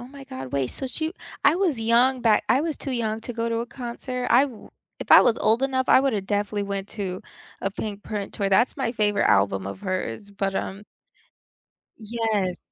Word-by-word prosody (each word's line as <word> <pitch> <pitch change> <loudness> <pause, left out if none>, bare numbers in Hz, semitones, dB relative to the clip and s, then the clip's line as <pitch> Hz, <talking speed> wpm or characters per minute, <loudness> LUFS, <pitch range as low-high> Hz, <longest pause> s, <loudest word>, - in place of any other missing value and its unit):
oh 245 - -10
my 275 0 -11
god, 260 - -8
wait, 140 -2 +1
so 265 - -5
she 315 +5 -3 0.3
I 290 - +6
was 345 -9 +1
young 240 +3 +3
back 220 -2 +4
I 260 - +4
was 315 -1 -2
too 275 - -6
young 225 -3 -1
to 245 - -6
go 230 0 -2
to 230 0 -1
a 235 - -3
concert, 250 +1 -5
I 245 +3 +7
w 240 -5 -12 0.3
if - - -8
I - - +11
was 235 - +3
old 225 +4 +2
enough, 260 -1 0
I - - +7
would've 220 -8 0
definitely 205 0 -1
went 200 0 -4
to 190 -3 -5 0.4
a 195 - -1
Pinkprint 205 0 -5
Tour 200 -2 -1
that's 215 +6 +3
my 265 -4 -1
favorite 210 -3 +1
album 95 -1 +2
of 100 - -7
hers, 185 - -4
but, 195 -1 -2
um 195 +2 -4 1.2
Yes. 215 -4 -1
225 Hz, 205 wpm, -24 LUFS, 200-255 Hz, 1.2 s, I